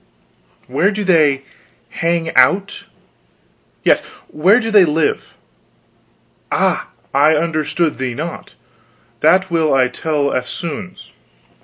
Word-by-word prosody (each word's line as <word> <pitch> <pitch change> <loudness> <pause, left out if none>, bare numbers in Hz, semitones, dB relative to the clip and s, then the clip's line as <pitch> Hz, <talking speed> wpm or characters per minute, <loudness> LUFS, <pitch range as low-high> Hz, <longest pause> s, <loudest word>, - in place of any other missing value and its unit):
"Where 140 +10 +1
do 210 0 -3
they 150 -7 +2 0.5
hang 165 +2 -2
out?" 195 +1 +2 1.0
"Yes, - - +3 0.3
where 190 +9 +3
do 225 -2 -3
they 205 -3 +7
live?" 155 -1 -1 1.2
"Ah, - - 0 0.3
I 150 +3 +4
understood 155 -1 -1
thee 130 -2 -3
not. 165 +5 -7 0.6
That 185 +5 +3
will 160 -2 +1
I 130 -1 +3
tell 145 +1 -2
eftsoons." 170 +9 -6
165 Hz, 105 wpm, -17 LUFS, 145-185 Hz, 1.2 s, they